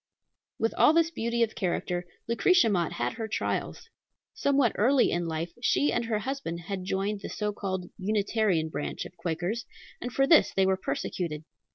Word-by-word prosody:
With 225 Hz, -, 0 dB
all 305 Hz, -, +7 dB
this 330 Hz, 0 st, +3 dB
beauty 235 Hz, -4 st, 0 dB
of 220 Hz, -, -1 dB
character, 175 Hz, -1 st, -2 dB, 0.2 s
Lucretia 235 Hz, +5 st, +4 dB
Mott 175 Hz, -4 st, 0 dB
had 120 Hz, +1 st, -2 dB
her 225 Hz, -, -4 dB
trials. 220 Hz, -, -3 dB, 0.5 s
Somewhat 275 Hz, -5 st, +2 dB
early 255 Hz, +4 st, +3 dB
in 175 Hz, 0 st, -1 dB
life 165 Hz, +1 st, -3 dB
she 285 Hz, +3 st, +2 dB
and 240 Hz, -, 0 dB
her 225 Hz, -2 st, 0 dB
husband 240 Hz, -7 st, -4 dB
had 185 Hz, +1 st, -5 dB
joined 200 Hz, +2 st, -1 dB
the -, -, -6 dB
so 210 Hz, -1 st, -2 dB
called 190 Hz, -3 st, -3 dB
Unitarian 200 Hz, -4 st, +1 dB
branch 150 Hz, -, -4 dB
of 180 Hz, -, -11 dB
Quakers, 175 Hz, +6 st, -2 dB, 0.4 s
and 245 Hz, -, -4 dB
for 270 Hz, +4 st, +3 dB
this 310 Hz, +2 st, +5 dB
they 195 Hz, -, +4 dB
were 190 Hz, 0 st, +3 dB
persecuted. 170 Hz, -4 st, -3 dB
205 Hz, 175 wpm, -28 LUFS, 175-235 Hz, 0.5 s, all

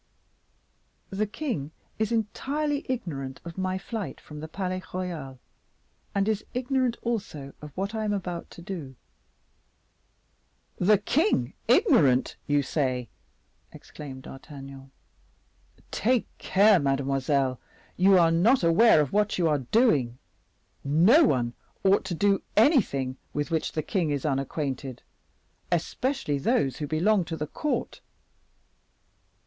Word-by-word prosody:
The 205 Hz, +2 st, -1 dB
king 205 Hz, -, -3 dB, 0.3 s
is 220 Hz, +1 st, 0 dB
entirely 280 Hz, +7 st, -1 dB
ignorant 140 Hz, -, -4 dB
of 170 Hz, -1 st, -7 dB
my 185 Hz, 0 st, -1 dB
flight 210 Hz, +2 st, -5 dB
from 150 Hz, -1 st, -10 dB
the 155 Hz, -, -6 dB
Palais 185 Hz, +2 st, -3 dB
Royal, 165 Hz, -8 st, -5 dB, 0.8 s
and 200 Hz, 0 st, +2 dB
is 215 Hz, -1 st, 0 dB
ignorant 255 Hz, -1 st, 0 dB
also 200 Hz, -12 st, -3 dB
of 150 Hz, 0 st, -9 dB
what 200 Hz, +3 st, -2 dB
I 220 Hz, -1 st, -2 dB
am 210 Hz, -, 0 dB
about 180 Hz, -4 st, -4 dB
to 170 Hz, -, -12 dB
do." 165 Hz, -9 st, -6 dB, 1.8 s
"The 205 Hz, +3 st, +4 dB
king 305 Hz, -, +1 dB
ignorant, 160 Hz, -, +4 dB
you 145 Hz, -1 st, +2 dB
say!" 130 Hz, -5 st, -1 dB, 0.6 s
exclaimed 135 Hz, -3 st, -10 dB
D'Artagnan. 135 Hz, -1 st, -10 dB, 1.0 s
"Take 245 Hz, +1 st, +1 dB
care, 200 Hz, 0 st, +5 dB
mademoiselle; 135 Hz, -1 st, 0 dB, 0.4 s
you 190 Hz, +1 st, +5 dB
are 165 Hz, -2 st, +5 dB
not 200 Hz, +9 st, +4 dB
aware 170 Hz, +1 st, +6 dB
of 145 Hz, -, -2 dB
what 210 Hz, 0 st, +2 dB
you 175 Hz, -2 st, +2 dB
are 150 Hz, -2 st, +2 dB
doing. 145 Hz, -, +3 dB, 0.7 s
No 180 Hz, -, +5 dB
one 120 Hz, -, +1 dB, 0.3 s
ought 195 Hz, +1 st, +4 dB
to 175 Hz, -, -3 dB
do 200 Hz, +3 st, +2 dB, 0.2 s
anything 180 Hz, -, +3 dB, 0.2 s
with 145 Hz, +3 st, -2 dB
which 160 Hz, -1 st, -1 dB
the 155 Hz, -, -1 dB
king 180 Hz, -7 st, 0 dB
is 145 Hz, -1 st, -2 dB
unacquainted, 135 Hz, -2 st, -3 dB, 0.7 s
especially 175 Hz, -, -1 dB
those 135 Hz, -1 st, +1 dB
who 150 Hz, -, -4 dB
belong 185 Hz, +6 st, +2 dB
to 160 Hz, -1 st, -5 dB
the 150 Hz, -, -2 dB
court." 300 Hz, -, -3 dB
170 Hz, 125 wpm, -27 LUFS, 140-215 Hz, 1.8 s, aware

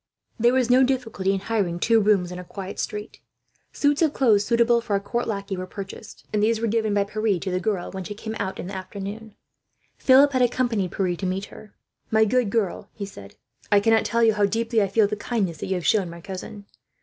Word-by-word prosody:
There 240 Hz, +2 st, +4 dB
was 250 Hz, -2 st, +2 dB
no 255 Hz, +1 st, +6 dB
difficulty 250 Hz, -7 st, 0 dB
in 195 Hz, -1 st, -1 dB
hiring 200 Hz, -5 st, -1 dB
two 225 Hz, +4 st, +4 dB
rooms 200 Hz, -4 st, +2 dB
in 180 Hz, -, -6 dB
a -, -, -7 dB
quiet 190 Hz, +1 st, -8 dB
street. 210 Hz, +1 st, -5 dB, 0.5 s
Suits 290 Hz, +1 st, +1 dB
of 315 Hz, -3 st, +3 dB
clothes 220 Hz, -6 st, +4 dB
suitable 235 Hz, +2 st, +3 dB
for 225 Hz, -3 st, -1 dB
a -, -, +2 dB
court 235 Hz, +4 st, -3 dB
lackey 200 Hz, -2 st, -3 dB
were 185 Hz, 0 st, -5 dB
purchased, 200 Hz, +2 st, -9 dB
and 210 Hz, -, +1 dB
these 220 Hz, +1 st, +2 dB
were 230 Hz, -, -1 dB
given 220 Hz, -1 st, 0 dB
by 200 Hz, -, +3 dB
Pierre 210 Hz, -1 st, 0 dB
to 190 Hz, +2 st, -4 dB
the 180 Hz, -, 0 dB
girl, 190 Hz, -2 st, -2 dB
when 190 Hz, 0 st, -5 dB
she 205 Hz, +3 st, -7 dB
came 220 Hz, +1 st, -6 dB
out 190 Hz, -1 st, -3 dB
in -, -, -5 dB
the 195 Hz, -, -7 dB
afternoon. 200 Hz, +3 st, -7 dB, 0.6 s
Philip 275 Hz, +2 st, +6 dB
had 255 Hz, -, +2 dB
accompanied 235 Hz, -6 st, +1 dB
Pierre 185 Hz, -3 st, -1 dB
to 190 Hz, -, -5 dB
meet 190 Hz, +2 st, -2 dB
her. 210 Hz, -, -14 dB, 0.3 s
"My 220 Hz, 0 st, +4 dB
good 245 Hz, 0 st, +1 dB
girl," 205 Hz, -3 st, -1 dB
he 205 Hz, -, -5 dB
said, 100 Hz, -, -12 dB, 0.4 s
"I 205 Hz, -, +6 dB
cannot 225 Hz, +2 st, +3 dB
tell 235 Hz, 0 st, +1 dB
you 225 Hz, -1 st, +5 dB
how 205 Hz, -1 st, +2 dB
deeply 225 Hz, +2 st, 0 dB
I 200 Hz, -, +2 dB
feel 210 Hz, +2 st, +3 dB
the 210 Hz, +1 st, -2 dB
kindness 205 Hz, -6 st, -2 dB
that -, -, -4 dB
you 190 Hz, -, 0 dB
have 180 Hz, -, -4 dB
shown 195 Hz, -5 st, +2 dB
my 170 Hz, 0 st, -9 dB
cousin. 195 Hz, +2 st, -8 dB
210 Hz, 235 wpm, -24 LUFS, 195-230 Hz, 0.6 s, no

